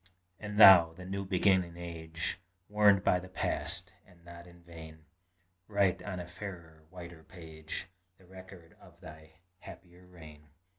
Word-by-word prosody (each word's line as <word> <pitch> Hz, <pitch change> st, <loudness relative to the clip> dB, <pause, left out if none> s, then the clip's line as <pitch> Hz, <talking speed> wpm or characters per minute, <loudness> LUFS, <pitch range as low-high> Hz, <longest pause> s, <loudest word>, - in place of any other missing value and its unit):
And 105 Hz, 0 st, -6 dB
thou, 90 Hz, -6 st, +8 dB
the 90 Hz, +2 st, -12 dB
new 100 Hz, +1 st, -5 dB
beginning 95 Hz, -2 st, +1 dB
age, 85 Hz, -1 st, -5 dB, 0.3 s
Warned 105 Hz, -2 st, +3 dB
by 90 Hz, -, +2 dB
the 90 Hz, +1 st, -12 dB
past, 95 Hz, -, -3 dB
and 90 Hz, -2 st, -23 dB
not 85 Hz, 0 st, -13 dB
in 85 Hz, 0 st, -18 dB
vain, 80 Hz, -2 st, -13 dB, 0.6 s
Write 100 Hz, -3 st, 0 dB
on 95 Hz, -3 st, -6 dB
a 90 Hz, -, -7 dB
fairer, 85 Hz, -3 st, -11 dB
whiter 85 Hz, -2 st, -12 dB
page, 80 Hz, -2 st, -9 dB, 0.3 s
The 95 Hz, -, -22 dB
record 90 Hz, -2 st, -15 dB
of -, -, -19 dB
thy 80 Hz, 0 st, -14 dB, 0.3 s
happier 90 Hz, 0 st, -15 dB
reign. 75 Hz, -4 st, -15 dB
85 Hz, 145 wpm, -30 LUFS, 80-95 Hz, 0.6 s, thou